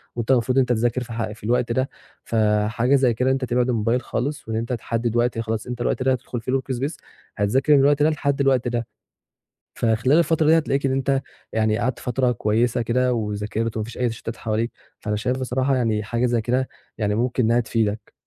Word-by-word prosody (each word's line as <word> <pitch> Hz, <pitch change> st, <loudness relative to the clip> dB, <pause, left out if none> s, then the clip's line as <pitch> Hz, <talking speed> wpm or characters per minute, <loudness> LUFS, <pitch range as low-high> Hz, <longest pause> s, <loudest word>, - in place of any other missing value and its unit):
وأنت 120 Hz, +1 st, -1 dB
المفروض 125 Hz, 0 st, +2 dB
إن -, -, +7 dB
أنت 130 Hz, -, +2 dB
تذاكر 120 Hz, +2 st, 0 dB
في 125 Hz, -, -13 dB
الح 115 Hz, -2 st, -3 dB
في 105 Hz, -1 st, -13 dB
الوقت 120 Hz, +2 st, +1 dB
ده، 130 Hz, +3 st, 0 dB, 0.3 s
فحاجة 110 Hz, +3 st, +2 dB
زي 130 Hz, -3 st, +3 dB
كده 125 Hz, +3 st, +1 dB
إن -, -, +3 dB
أنت 135 Hz, -1 st, -1 dB
تبعد 125 Hz, 0 st, +1 dB
الموبايل 115 Hz, +1 st, +1 dB
خالص 140 Hz, +2 st, -3 dB
وإن 110 Hz, -, -3 dB
أنت 115 Hz, +3 st, -2 dB
تحدِّد 115 Hz, 0 st, -2 dB
وقت 120 Hz, 0 st, +1 dB
آآ، -, -, 0 dB
خلاص 110 Hz, 0 st, -3 dB
أنت 125 Hz, -1 st, -5 dB
الوقت 125 Hz, -, 0 dB
ده 130 Hz, -, +3 dB
هتدخل 125 Hz, -2 st, -3 dB
فيه 125 Hz, -, -3 dB
الwork 130 Hz, 0 st, -1 dB
space 140 Hz, +5 st, -2 dB, 0.4 s
هتذاكر 130 Hz, +9 st, +3 dB
من 145 Hz, -, +6 dB
الوقت 145 Hz, +1 st, +4 dB
ده 155 Hz, -, +5 dB
لحد 140 Hz, -2 st, 0 dB
الوقت 135 Hz, -3 st, +2 dB
ده، 120 Hz, -1 st, -2 dB, 0.9 s
فخلال 120 Hz, +6 st, +2 dB
الفترة 165 Hz, -2 st, +2 dB
دي 160 Hz, +2 st, +6 dB
هتلاقيك 140 Hz, -3 st, 0 dB
إن 135 Hz, -, +1 dB
أنت 135 Hz, 0 st, +1 dB, 0.3 s
يعني 110 Hz, 0 st, +1 dB
قعدت 120 Hz, +2 st, -1 dB
فترة 125 Hz, 0 st, 0 dB
كويسة 115 Hz, +2 st, +1 dB
كده، 125 Hz, +2 st, +1 dB
وذاكرت 110 Hz, +1 st, -2 dB
وما 110 Hz, -, -1 dB
فيش 115 Hz, -, -9 dB
أي 125 Hz, -1 st, +1 dB
تشتُّتات 115 Hz, 0 st, -6 dB
حواليك، 110 Hz, +1 st, -1 dB, 0.3 s
فأنا 105 Hz, -1 st, -2 dB
شايف 125 Hz, +5 st, -1 dB
بصراحة 130 Hz, +1 st, 0 dB
يعني 110 Hz, -4 st, +1 dB
حاجة 115 Hz, +4 st, 0 dB
زي 120 Hz, -1 st, +1 dB
كده 125 Hz, +4 st, 0 dB, 0.3 s
يعني 105 Hz, -2 st, 0 dB
ممكن 125 Hz, +2 st, 0 dB
إنها 115 Hz, +2 st, +3 dB
تفيدك. 110 Hz, -2 st, -2 dB
120 Hz, 215 wpm, -23 LUFS, 115-130 Hz, 0.9 s, إن